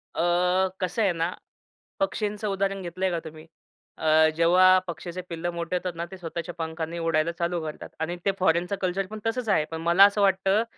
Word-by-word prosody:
अ, 180 +2 +2
कसं 185 +4 -1
आहे 200 - +3
ना, 165 +2 -1 0.7
पक्षींचं 210 -7 -1
उदाहरण 195 0 -1
घेतलंय 185 +1 -2
का 170 - -1
तुम्ही? 155 0 -10 0.5
अ, 155 0 +4
जेव्हा 185 +2 +6
पक्षाचे 175 +1 -6
पिल्लं 170 +1 -3
मोठे 170 +1 -3
होतात 180 0 -2
ना 170 +1 -3
ते 190 - -8
स्वतःच्या 170 0 -6
पंखाने 160 +1 -4
उडायला 165 0 +1
चालू 170 0 -2
करतात. 155 -1 -7
आणि 160 +2 -2
ते 200 - +4
फॉरेनचं 180 +1 +2
कल्चर 190 +1 0
पण 215 - -6
तसंच 225 0 -2
आहे. 155 -6 +3
पण 160 0 -4
मला 170 +4 +6
असं 205 +1 +2
वाटतं, 195 +2 +3
175 Hz, 185 wpm, -26 LUFS, 165-190 Hz, 0.7 s, जेव्हा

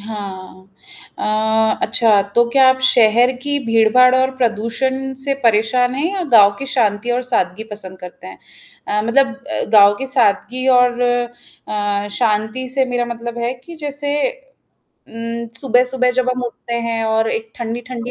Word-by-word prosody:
हाँ, 195 -3 -9 0.5
अ, 220 +1 0
अच्छा, 225 -3 +3
तो 235 - +4
क्या 265 0 +5
आप 260 0 +3
शहर 240 0 +4
की 285 0 0
भीड़-भाड़ 230 +3 +4
और 260 0 +2
प्रदूषण 260 +3 -2
से 275 - 0
परेशान 235 +3 +2
हैं 280 - -2
या 380 - -2
गाँव 205 -4 +7
की 275 - -6
शांति 230 -2 0
और 245 +1 0
सादगी 220 -4 -1
पसंद 190 -3 -7
करते 180 -1 -11
हैं? 95 0 -11 0.5
अ, 210 0 0
मतलब 265 +2 +2 0.2
अ, - - -2
गाँव 205 -1 +7
की 270 - -4
सादगी 255 0 0
और 245 -1 +2
अ, 235 -4 -3
शांति 215 +5 -1
से 265 +1 +2
मेरा 245 -1 -2
मतलब 235 0 -6
है 235 +1 -2
कि 340 +2 -11
जैसे 290 -1 -3 0.9
उम, 230 +1 -6
सुबह-सुबह 250 0 +2
जब 255 0 0
हम 250 - -5
उठते 235 0 -6
हैं 225 -1 -2
और 220 0 0
एक 225 0 -4
ठंडी-ठंडी 235 +1 -6
235 Hz, 155 wpm, -17 LUFS, 215-255 Hz, 0.9 s, गाँव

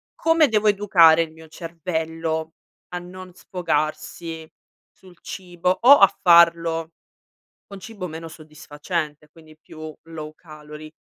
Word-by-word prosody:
come 325 -1 +3
devo 215 -3 +1
educare 185 -6 +5
il 160 -1 -3
mio 160 0 -15
cervello 160 -1 -4 0.4
a 180 - -5
non 185 +1 -11
sfogarsi 160 -1 -4 0.5
sul 180 -2 -19
cibo, 180 -1 -3
o 275 +4 +8
a 195 - +7
farlo 170 -1 +4 0.8
con 200 - -11
cibo 200 -4 -8
meno 165 0 -8
soddisfacente, 155 0 -6
quindi 155 -1 -18
più 155 0 -10
low 155 -2 -9
calory? 155 -1 -12
165 Hz, 120 wpm, -22 LUFS, 155-180 Hz, 0.8 s, o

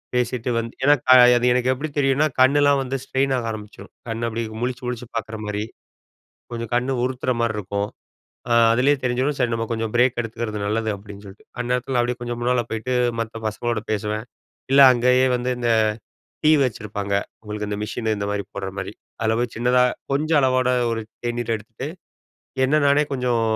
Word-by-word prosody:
பேசிட்டு 125 0 -1
வந்து 115 0 -5
ஏனா 145 +2 +6 0.4
அது 120 - 0
எனக்கு 125 +1 +2
எப்படி 145 +5 -4
தெரியுனா, 140 +1 +3
கண்ணெல்லாம் 140 +2 +5
வந்து 130 +1 -4
ஸ்ட்ரெயின் 135 0 0
ஆக 120 - -3
ஆரம்பிச்சுடும். 105 -1 -10 0.2
கண்ண 115 0 -3
அப்படியே 115 0 -3
முழிச்சு 125 +1 -3
முழிச்சு 125 0 -4
பார்க்குற 110 -1 -4
மாரி, 105 0 -2 0.9
கொஞ்சம் 115 0 -5
கண்ண 125 +2 0
உருத்துற 130 0 -1
மாரிருக்கும். 105 -2 -2 0.6
ஆ - - +3 0.2
அதிலேயே 130 +5 +3
தெரிஞ்சிரும் 130 +3 0
சரி 125 -3 +1
நம்ம 115 0 -1
கொஞ்சம் 115 -1 -2
பிரேக் 125 +1 +3
எடுத்துக்கிறது 115 -2 -4
நல்லது 110 +2 -1
அப்படின்னு 100 0 -12
சொல்லிட்டு, 100 +1 -14
அந்நேரத்தில 125 +1 -1
அப்படியே 120 0 -1
கொஞ்சம் 120 -1 -4
முன்னால 125 0 +1
போயிட்டு 110 +3 -3 0.3
மத்த 115 0 -5
பசங்களோடு 115 +1 -2
பேசுவேன். 105 +1 -2 0.5
இல்ல, 140 +1 +7
அங்கேயே 125 +1 +3
வந்து 125 +1 -2
இந்த 120 -1 -1 0.8
டீ 155 - +7
வச்சிருப்பாங்க. 105 -4 -3 0.3
உங்களுக்கு 105 -1 -5
இந்த 105 - -3
மிஷினு 110 0 -2
இந்த 100 - -3
மாரி 100 -1 -2
போடுற 100 -1 -4
மாரி. 95 +2 -5 0.3
அதில 110 0 +1
போய் 120 -1 -2
சின்னதா 125 +2 +3 0.3
கொஞ்சம் 155 +2 +2
அளவோட 130 -1 +2 0.2
ஒரு 115 -1 -2 0.2
தேநீர் 120 -1 -1
எடுத்துட்டு, 115 +6 -8 0.8
என்ன 155 +3 +3
நானே 140 +1 +4
கொஞ்சம் 125 -3 0
120 Hz, 165 wpm, -22 LUFS, 110-130 Hz, 0.9 s, இல்ல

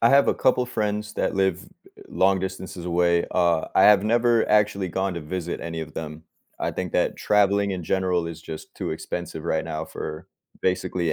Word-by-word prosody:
I 115 - +7
have 140 +1 +5
a - - +3
couple 125 -1 +2
friends 105 -2 -2
that - - -1
live 95 -2 +2
e - - -16
eh - - -17 0.4
long 95 0 +2
distances 95 -2 -5
away, 85 0 +2
uh, 85 -3 +2
I - - +5
have 105 -1 +7
never 115 +1 +3
actually 105 -2 +2
gone 95 +1 -1
to 85 - -4
visit 85 +2 -4
any 85 -1 -4
of 80 - -7
them. 75 0 -6 0.4
I - - -1
think - - -4
that - - +1
traveling 100 -1 +2
in 90 -2 -4
general 90 -2 0
is 85 -1 -7
just 80 -1 -9
too - - -4
expensive 85 -2 -5
right 80 -1 0
now 80 +1 -4
for 75 -1 -7 0.4
basically 90 -2 0
95 Hz, 200 wpm, -24 LUFS, 85-100 Hz, 0.4 s, I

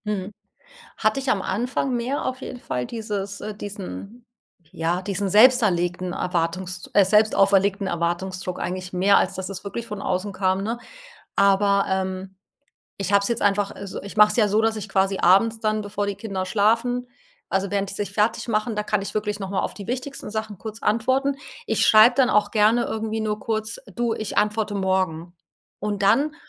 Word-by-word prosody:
Mhm. 205 -1 -3 0.6
Hatte 215 +4 +1
ich 270 -1 -1
am 195 -7 +1
Anfang 245 +6 -1
mehr 245 +4 -2
auf 260 0 -3
jeden 250 - -7
Fall 125 - -3
dieses 205 -3 -5
äh, 215 0 -5
diesen 205 +3 -8 0.5
ja, 170 +3 -1
diesen 200 +1 -2
selbst 250 +6 +6
erlegten 175 -2 0
Erwartungs 180 +1 -2
äh, 200 - +6
selbstauferlegten 200 -1 +3
Erwartungsdruck 180 +1 -2
eigentlich 185 0 -4
mehr, 190 +2 +4
als 190 - 0
dass 190 0 -5
es 190 -1 -6
wirklich 230 +3 -5
von 210 -3 -6
außen 190 +2 -2
kam, 190 0 0
ne? 230 +3 -2 0.6
Aber, 200 0 +4
ähm, 190 0 -3 0.7
ich 195 0 -2
habe 200 - +6
es 200 - -1
jetzt 235 0 0
einfach 205 0 +1
äh, 200 - -8
so, 190 - -7
ich 200 +2 -9
mache 210 0 +8
es - - -3
ja 220 -3 +4
so, 210 +2 +3
dass 225 0 +1
ich 215 -1 -6
quasi 195 -1 +1
abends 220 +5 +4
dann, 215 -1 0
bevor 205 0 -3
die 200 -1 -3
Kinder 195 -2 -4
schlafen 230 +5 +1 0.4
also 195 0 0
während 200 -1 -1
die 195 - -6
sich 205 - -3
fertigmachen, 215 +1 0
da 210 - -1
kann 210 -1 0
ich 200 - -6
wirklich 210 -1 -2
noch 195 -2 -5
mal 195 - 0
auf - - -3
die 200 - -9
wichtigsten 255 0 -4
Sachen 220 -2 -5
kurz 220 0 -8
antworten. 260 +6 +1 0.3
Ich - - +1
schreibe 220 +3 +7
dann 260 -1 +3
auch 205 0 +2
gerne 220 +2 +4
irgendwie 220 0 -3
nur 215 -1 -2
kurz: 220 +1 -3 0.2
„Du, 235 0 0
ich 215 -2 -5
antworte 210 0 +1
morgen.“ 185 -3 -1 0.4
Und 205 -1 -2
dann 290 +10 +3
205 Hz, 190 wpm, -23 LUFS, 190-220 Hz, 0.7 s, mache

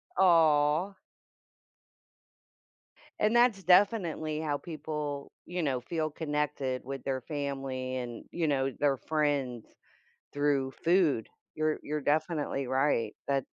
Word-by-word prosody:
Aw! 165 0 +4 2.2
And 215 +3 +2
that's 240 -5 +4
definitely 175 -5 +3
how 145 -2 -1
people, 150 -3 -5
you 180 -1 -3
know, 130 -4 0
feel 155 +3 -2
connected 145 -4 -2
with 135 -1 -6
their 130 -1 -2
family 135 -3 -4
and, 120 -2 -6
you 170 -2 -1
know, 135 -2 +1
their 140 -2 +2
friends, 140 -6 -1 0.7
through 140 -2 +1
food. 165 - +3 0.3
You're 155 0 0
you're 150 +1 -2
definitely 150 -2 0
right. 130 -5 +1
That 140 -2 +1
150 Hz, 110 wpm, -30 LUFS, 135-160 Hz, 2.2 s, Aw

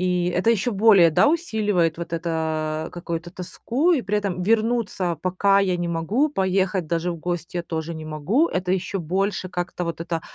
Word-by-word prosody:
И 180 -1 +1
это 185 +6 +2
ещё 230 +2 +1
более, 195 -5 +6
да, 155 - +4
усиливает 210 - 0
вот 170 0 -6
это, 160 -1 -2
какую-то 170 -1 -5
тоску, 235 - -1
и 270 -7 +1
при 205 +2 0
этом 185 -3 -3
вернуться 215 -5 0
пока 185 +4 +2
я 185 -2 +1
не 175 0 -2
могу, 185 - +1
поехать 190 - 0
даже 170 +2 -1
в 170 - -5
гости 175 +1 -4
я - - -2
тоже 165 0 -4
не 160 0 -7
могу- 165 - +1
это 180 0 -2
ещё 190 +1 -2
больше 185 +3 -1
как-то 175 0 -4
вот 165 -1 -4
это 165 -1 -3
180 Hz, 185 wpm, -23 LUFS, 165-200 Hz, -, более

